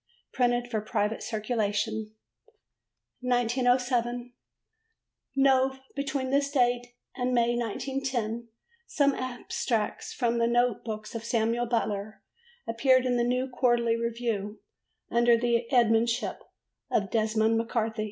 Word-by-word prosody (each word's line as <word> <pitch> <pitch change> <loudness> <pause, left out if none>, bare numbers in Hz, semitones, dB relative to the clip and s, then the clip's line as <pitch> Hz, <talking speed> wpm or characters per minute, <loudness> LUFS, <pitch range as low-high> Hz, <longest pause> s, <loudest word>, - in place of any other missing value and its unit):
Printed 245 -1 +1
for 220 -3 -2
private 210 0 -1
circulation. 215 -1 -2 1.0
1907. 245 0 +1 1.0
Nov. 265 -1 +3 0.2
Between 270 -2 -2
this 280 0 +2
date 245 -3 +1 0.3
and 250 -1 0
May, 240 0 +3
1910, 240 -1 -2 0.4
some 280 -2 +2
Extracts 245 -3 -3
from 235 -2 0
The 230 - +3
Note 240 -1 +2
Books 215 0 -6
of 230 -1 -5
Samuel 230 +1 0
Butler 215 -3 -2 0.4
appeared 255 +3 +3
in 250 -1 +1
the 240 - +2
New 250 +2 0
Quarterly 240 -2 +2
Review 230 -3 -2 0.5
under 235 0 +4
the 235 0 0
editorship 230 -1 +2 0.5
of 195 -2 0
Desmond 220 0 +2
MacCarthy. 225 -1 -2
240 Hz, 110 wpm, -28 LUFS, 225-250 Hz, 1.0 s, under